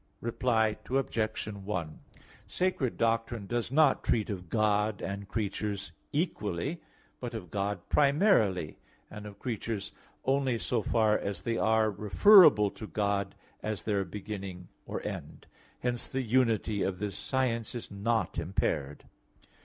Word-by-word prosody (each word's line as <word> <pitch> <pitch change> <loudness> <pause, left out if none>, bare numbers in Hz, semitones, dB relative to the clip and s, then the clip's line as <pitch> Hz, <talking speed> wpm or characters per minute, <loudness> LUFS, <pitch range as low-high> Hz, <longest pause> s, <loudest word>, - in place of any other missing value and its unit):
Reply 115 -2 +1
Obj. 115 -5 -1
1: 95 -6 -4 0.5
Sacred 180 -9 -1
doctrine 115 -1 0
does 120 +3 -2
not 150 -1 +4
treat 110 -2 +1
of 90 -3 -6
God 105 0 +1
and 100 0 -5
creatures 100 -1 -3 0.2
equally, 145 - -2 0.4
but 120 -1 -5
of 90 -6 -7
God 100 0 -2
primarily, 140 - +3 0.3
and 105 0 -8
of 100 -1 -11
creatures 110 -3 -4 0.3
only 135 -2 +2
so 120 +1 0
far 110 -2 +2
as 100 -3 -4
they 115 - -1
are 110 -1 +3
referable 105 - +7
to 110 - -8
God 100 -2 -1 0.3
as 105 -5 -3
their 100 -1 +1
beginning 95 -1 -7 0.2
or - - -5
end. - - -6 0.4
Hence 120 -1 -1
the 135 0 -2
unity 115 -4 +1
of 95 -1 -1
this 105 0 -3
science 125 -4 -1
is 120 - -6
not 100 -3 -1
impaired. 75 -4 -2
110 Hz, 130 wpm, -30 LUFS, 100-120 Hz, 0.5 s, referable